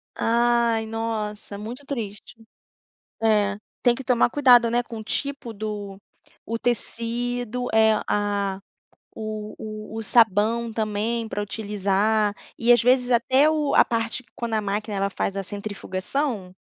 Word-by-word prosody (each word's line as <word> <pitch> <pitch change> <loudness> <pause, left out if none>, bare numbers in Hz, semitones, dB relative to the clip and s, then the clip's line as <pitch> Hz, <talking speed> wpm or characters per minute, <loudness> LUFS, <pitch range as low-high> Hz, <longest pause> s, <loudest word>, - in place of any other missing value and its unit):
Ai, 235 -1 +2
nossa! 220 -2 -4
Muito 240 +7 -7
triste. 225 -6 -6 0.9
É, 205 -2 +3 0.3
tem 240 -1 +5
que 270 - -7
tomar 245 -2 +3
cuidado, 245 -4 +6
né, 240 +1 +1
com 230 -1 -8
o 220 - -6
tipo 275 -1 -3
do 205 -2 -5 0.5
o 230 +1 -2
tecido, 245 +1 -2
é 220 0 +5
a 200 -2 0 0.6
o 215 -1 -5 0.4
o - - -4
o 225 - -3
sabão 225 +1 +3
também 220 +1 -1
pra 205 - -3
utilizar, 205 0 0 0.2
e 240 +1 +3
às 240 - +6
vezes 250 +1 +3
até 260 +5 +4
o 305 -2 +1
a - - +7
parte 230 +2 -2
que - - -31
quando 235 -2 -4
a 215 - +1
máquina, 210 +1 -2
ela 195 0 +1
faz 195 - -2
a 195 - -2
centrifugação 200 +2 -3
225 Hz, 145 wpm, -24 LUFS, 205-240 Hz, 0.9 s, a